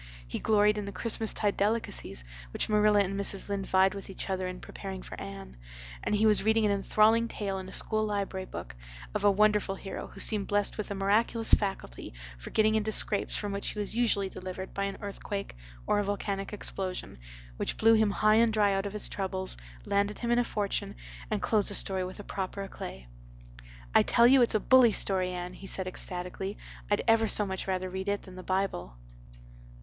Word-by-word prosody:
He - - -4
gloried 210 -1 +3
in 205 - -4
the 200 - -5
Christmas 220 +2 -1
tide 205 -2 0
delicacies 210 - -1 0.3
which - - -1
Marilla 210 -1 +4
and 195 0 -1
Mrs. 200 0 -1
Lynde 200 -1 -2
vied 190 0 +4
with 200 -1 -8
each 195 0 -5
other 185 -1 -1
in 180 0 -6
preparing 190 -2 -7
for - - -10
Anne, 195 - -9 0.5
and - - 0
he 210 +1 +2
was 210 -1 +5
reading 220 +1 +3
an 205 - +3
enthralling 215 +3 +3
tale, 200 -4 -3
in 185 0 -8
a - - -10
school 215 +2 +2
library 200 -3 -2
book, - - -8 0.4
of - - -2
a 205 - +6
wonderful 210 -1 +2
hero 195 - -7
who - - -13
seemed 210 -3 +3
blessed 205 -1 +1
with 210 - -4
a 200 - -3
miraculous 215 +4 +1
faculty 195 - 0 0.2
for - - -8
getting 215 0 +3
into 220 0 0
scrapes 205 -1 0
from 205 -1 -2
which 200 0 -3
he - - -3
was 205 -1 -1
usually 225 -5 +2
delivered 185 0 -7
by 200 - -1
an 195 - -4
earthquake 200 - -5 0.3
or - - +2
a - - +1
volcanic 200 -1 -3
explosion, 185 - -3 0.4
which - - -2
blew 225 +1 +5
him 220 -1 +4
high 215 +1 +3
and 230 -1 +4
dry 205 -2 +3
out 195 +1 -1
of 200 - -7
his 210 - 0
troubles, 190 -1 -3 0.3
landed 200 +1 0
him 235 0 -2
in 240 - +4
a - - +3
fortune, 205 -4 -2 0.3
and - - -2
closed 210 -3 +2
the 205 - +1
story 190 -1 +1
with 185 +3 -7
proper 195 +1 -4
éclat. 65 - -8 0.9
"I - - +7
tell 235 - +4
you 260 +2 +7
it's 235 - +5
a - - +4
bully 250 -1 +6
story, 185 -2 +2
Anne," 180 0 -5
he 195 - -10
said 190 - -2
ecstatically. 185 +2 -2 0.3
"I'd 205 - +1
ever 225 -1 +4
so 210 0 +2
much 190 -1 -4
rather 185 -1 -1
read 190 +2 -4
it 200 0 -1
than 185 - -12
the 185 - -8
Bible." 185 - -2
200 Hz, 205 wpm, -29 LUFS, 190-215 Hz, 0.9 s, I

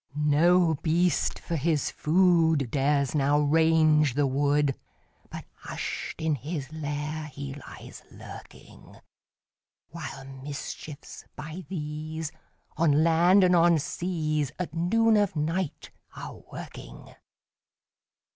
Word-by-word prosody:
No 160 +4 +4
beast, 170 0 +1
for 170 - -4
his 155 -1 0
food, 160 -5 +3
Dares 140 0 +1
now 145 0 +2
range 155 -2 +3
the 145 0 +2
wood, 140 +1 +2 0.6
But - - -8
hush'd - - -5
in 160 -1 +2
his 145 +2 -5
lair 150 0 -4
he 140 -1 -7
lies 145 - -11
lurking; - - -13 0.9
While 150 -5 -8
mischiefs, 140 +2 -8
by 155 +3 -8
these, 155 -2 -5 0.5
On 155 -2 +3
land 175 +4 +5
and 180 0 +4
on 170 -1 +5
seas, 155 -2 -2
At 180 -4 -4
noon 220 +7 +3
of 205 -4 +1
night 160 +2 -2 0.2
are - - -7
a - - -12
working. - - -10
155 Hz, 110 wpm, -27 LUFS, 145-170 Hz, 0.9 s, land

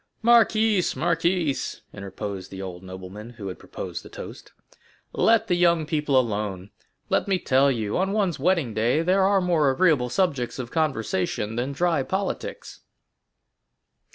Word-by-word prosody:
"Marquise, 225 -4 +4
marquise!" 170 -3 0
interposed 100 -1 -6
the 95 - -9
old 90 -2 -7
nobleman 95 +4 -9
who 110 -5 -7
had 90 - -8
proposed - - -7
the - - -13
toast, - - -10 0.6
"let 225 -1 +3
the 180 - 0
young 170 -2 +3
people 150 -3 +1
alone; 105 -5 -3 0.4
let - - +1
me 195 -1 +2
tell 140 -4 +3
you, 110 -5 -2
on 190 +1 +1
one's 200 -7 0
wedding 165 -6 +1
day 120 +9 +1
there 185 +3 +3
are 195 +1 +4
more 170 -6 +2
agreeable 140 -4 +2
subjects 140 -7 0
of 125 -3 -6
conversation 115 - -1
than 125 +4 -2
dry 165 0 +1
politics." 195 - -4
145 Hz, 145 wpm, -24 LUFS, 110-180 Hz, 0.6 s, Marquise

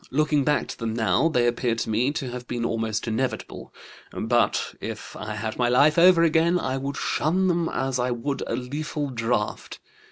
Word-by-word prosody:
Looking 150 +1 +2
back 150 +1 +1
to - - -7
them 115 -1 -3
now, 120 +8 +2
they 125 -6 +2
appear 120 0 0
to 115 - -3
me 120 +6 +2
to 135 -5 -4
have 125 0 -7
been 120 -1 -2
almost 110 -1 -2
inevitable; 125 +4 -3 0.4
but 120 +2 0
if - - -7
I 105 0 -5
had 110 +2 -4
my 120 -1 +3
life 145 +6 +4
over 175 -1 +6
again 165 +2 +3
I 130 -6 -2
would 140 +1 -4
shun 185 +5 +1
them 170 -2 +1
as 130 0 -2
I 125 +1 0
would 125 +4 -3
a - - -1
lethal 145 +3 -4
draught. 115 -2 -2
125 Hz, 190 wpm, -25 LUFS, 115-150 Hz, 0.4 s, over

